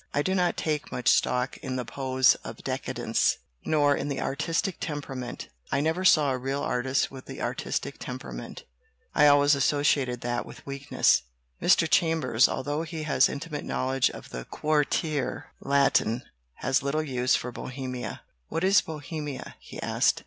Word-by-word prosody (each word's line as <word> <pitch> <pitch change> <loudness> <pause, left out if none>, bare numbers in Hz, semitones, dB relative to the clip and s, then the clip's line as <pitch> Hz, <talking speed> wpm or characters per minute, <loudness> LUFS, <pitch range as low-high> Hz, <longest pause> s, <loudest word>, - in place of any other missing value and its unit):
I 145 - +2
do 190 - 0
not 180 -2 +1
take 150 -2 -2
much 125 - +1
stock 125 +1 +2
in 130 - -4
the 125 -1 -2
pose 130 -1 +3
of - - -8
'decadence/ - - 0 0.3
nor 145 -2 +3
in 140 - -3
the 140 -2 -2
artistic 165 +6 -1
temperament. 135 -5 -5 0.2
I 140 - +2
never 160 +5 0
saw 155 -6 +5
a 130 - -1
real 135 +2 -2
artist 130 +2 0
with 130 -1 -10
the - - -8
artistic - - -3
temperament. - - -7 0.5
I 150 - +6
always 145 0 +6
asso 145 +1 +1
ciated 125 -4 +2
that 120 0 -1
with - - -13
weakness." 140 0 +2 0.4
Mr. - - +5
Chambers, 160 -8 +3
although 145 +3 -2
he 160 -1 -5
has 140 -4 +4
intimate 150 +1 -5
knowl 130 +1 -2
edge 135 -1 +3
of - - -10
the 60 0 -6
Quartier 150 0 -1
Latin, 135 -4 +2 0.3
has 130 - +1
little 140 +3 0
use 125 -3 +1
for 125 - -3
"Bohemia." 130 0 -6 0.2
"What 165 - -2
is 195 +2 +5
Bohemia?" 150 -2 -6
he - - -10
asked. - - +2
140 Hz, 165 wpm, -27 LUFS, 130-150 Hz, 0.5 s, I